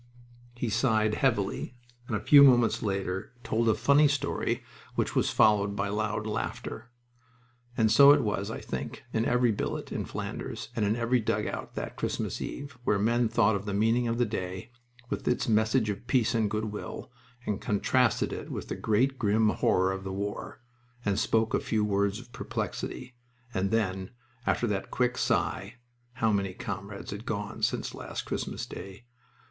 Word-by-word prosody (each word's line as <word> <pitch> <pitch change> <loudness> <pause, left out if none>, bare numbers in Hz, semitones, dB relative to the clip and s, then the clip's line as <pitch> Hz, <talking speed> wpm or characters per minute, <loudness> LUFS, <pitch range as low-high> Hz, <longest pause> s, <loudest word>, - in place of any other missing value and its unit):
He 120 -1 -2
sighed 110 -1 +2
heavily, 115 -2 0 0.3
and 110 - -1
a - - 0
few 140 +7 +7
moments 120 -4 +6
later 95 -1 -2
told 115 +1 +1
a 110 - +4
funny 140 +6 +5
story, 145 0 -1 0.3
which - - -1
was - - +2
followed 100 -1 +3
by 100 0 -1
loud 105 0 -1
laughter. 105 - -4 0.9
And 110 -1 +3
so 140 +5 +9
it 145 -2 +5
was, 105 -1 -1
I 110 - -4
think, - - -5
in 110 +1 +1
every 125 -1 +3
billet 105 - -3
in - - -2
Flanders - - -5
and 110 - +1
in 105 +2 +2
every 120 +1 +2
dugout 110 - -2
that - - -5
Christmas - - -2
Eve, 140 -2 -6
where 105 - +2
men 115 +3 +2
thought 110 -2 +3
of 100 0 -4
the 100 -1 -2
meaning 115 +3 +2
of 115 0 0
the 120 - +3
day, 95 0 -5 0.4
with - - -3
its 125 - +1
message 110 0 +2
of 105 +4 -8
peace 125 -2 +2
and 110 -3 +1
goodwill, 105 0 -4 0.3
and 105 - -2
contrasted 115 +3 +2
it - - -6
with - - -5
the - - -2
great, 130 +5 +1
grim 110 0 +3
horror 95 0 +2
of 95 0 -4
the 95 - -4
war, 100 +4 -5 0.4
and 100 -1 +1
spoke 110 0 +1
a - - +3
few 110 -2 0
words 100 0 +1
of 120 0 -13
perplexity; 125 0 -4 0.4
and 95 +1 0
then, 95 -4 0 0.4
after - - +2
that 100 -4 -2
quick 125 0 +1
sigh 105 -2 0 0.4
(how 110 -3 +1
many 100 -2 0
comrades 100 -4 -6
had 100 +2 -6
gone 105 -4 -4
since - - 0
last - - -5
Christmas - - -4
Day!) 100 +5 -9
110 Hz, 175 wpm, -29 LUFS, 100-120 Hz, 0.9 s, so